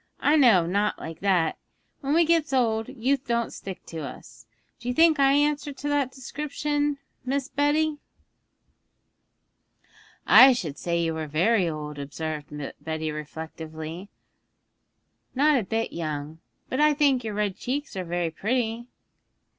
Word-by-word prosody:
I 295 - +3
know 235 - +6
of 165 - -4
nought 205 +2 +1
like 160 0 -8
that; 185 -5 +1 0.4
when 280 +2 0
we 335 0 +5
gets 320 -3 +2
old, 225 -4 +1
youth 265 +3 -1
don't 235 -1 0
stick 190 -2 -8
to 165 - -7
us. 140 -5 -10 0.3
Do 240 - -9
you 250 - -1
think 320 -2 +5
I 275 0 +5
answer 290 0 +1
to 285 +1 -6
that 285 -3 +1
description, 290 +2 -2 0.3
Miss 275 +1 -2
Betty?' 295 +1 +1 2.3
'I 265 0 +9
should 160 - -4
say 170 -1 -1
you 165 -1 0
were 160 -1 -4
very 180 +5 +2
old,' 150 -2 -6
observed 150 +1 -5 0.3
Betty 160 -1 -3
reflectively, 160 +3 -7 1.3
'not 290 +1 +4
a - - -2
bit 225 +3 -2
young; 155 -1 -4 0.3
but 260 - -3
I 300 0 +4
think 280 -4 +3
your 215 -2 -4
red 205 -2 -1
cheeks 280 +1 -4
are 185 - -2
very 175 -1 -2
pretty.' 230 +4 -2
225 Hz, 145 wpm, -26 LUFS, -, 2.3 s, I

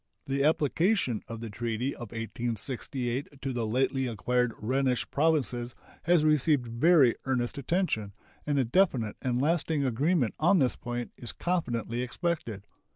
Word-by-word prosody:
The 140 0 0
application 155 - +2
of 115 0 -7
the 115 -2 -6
treaty 120 +4 -2
of 120 -3 -8
1868 120 +4 -3
to 135 -1 -3
the 115 -2 -1
lately 130 +3 +1
acquired 125 +2 0
Rhenish 130 +2 0
provinces 125 -6 0 0.3
has 170 -2 +4
received 150 -3 +3
very 130 +3 +4
earnest 130 0 -1
attention, 130 - -1 0.3
and 145 -1 +1
a 135 - +3
definite 125 - +1
and 125 -1 0
lasting 155 0 +1
agreement 135 - +1
on 175 +5 +4
this 130 -6 +2
point 120 0 -5
is 120 - -5
confidently 120 -9 -1
expected. 125 - -3
130 Hz, 140 wpm, -29 LUFS, 120-150 Hz, 0.3 s, has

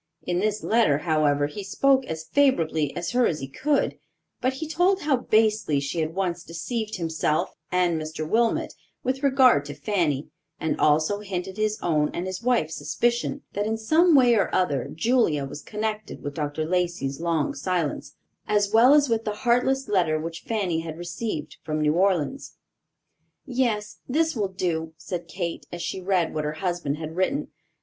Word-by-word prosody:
In 175 0 -1
this 215 +1 -1
letter, 220 -11 +3
however, 150 -2 +2
he 150 +8 -6
spoke 265 +6 +2
as 160 0 -4
favorably 160 - +2
of 175 - -3
her 245 -1 +3
as 155 - -2
he 135 - -5
could; 150 - 0 0.4
but 255 +1 +1
he 305 +4 -5
told 360 +5 +2
how 295 -2 +2
basely 215 - +2
she 140 +4 -3
had 160 +1 -2
once 180 -3 -1
deceived 215 +7 -4
himself 160 -3 -1 0.2
and 175 -3 +2
Mr. 155 0 -5
Wilmot, 230 +5 +1 0.3
with 260 +1 -1
regard 265 - +5
to 145 - -7
Fanny, 165 -9 -1 0.3
and 160 - -1
also 155 +7 +3
hinted 190 -1 -5
his 215 0 0
own 150 -3 +2
and 175 - -2
his 185 +1 -4
wife's 230 -10 +1
suspicion, 240 - -1
that, 205 +1 -1
in 225 0 -1
some 315 +9 +4
way 250 -3 +6
or 210 -4 +2
other, 145 -8 0
Julia 165 - +2
was 135 +2 -8
connected 215 0 -4
with 145 - -4
Dr. 150 +1 -2
Lacey's 170 -5 -1
long 165 -4 0
silence, 165 +1 -2 0.3
as 205 0 +1
well 245 +6 +7
as 290 -1 +4
with 225 -2 0
the 210 - -2
heartless 255 +3 +2
letter 175 -6 +2
which 165 +1 -5
Fanny 195 -7 0
had 165 -1 -6
received 175 -2 -5
from 155 0 -3
New 150 0 +2
Orleans. 185 - 0 0.9
"Yes, 225 -5 -1
this 320 +3 +1
will 210 -4 0
do," 165 -4 -2
said 175 -1 -5
Kate, 170 0 -4
as 175 0 -5
she 190 - -3
read 180 -3 +1
what 155 - -2
her 150 0 -2
husband 165 -3 -2
had 160 0 -6
written. 270 +11 0
180 Hz, 175 wpm, -25 LUFS, 155-230 Hz, 0.9 s, well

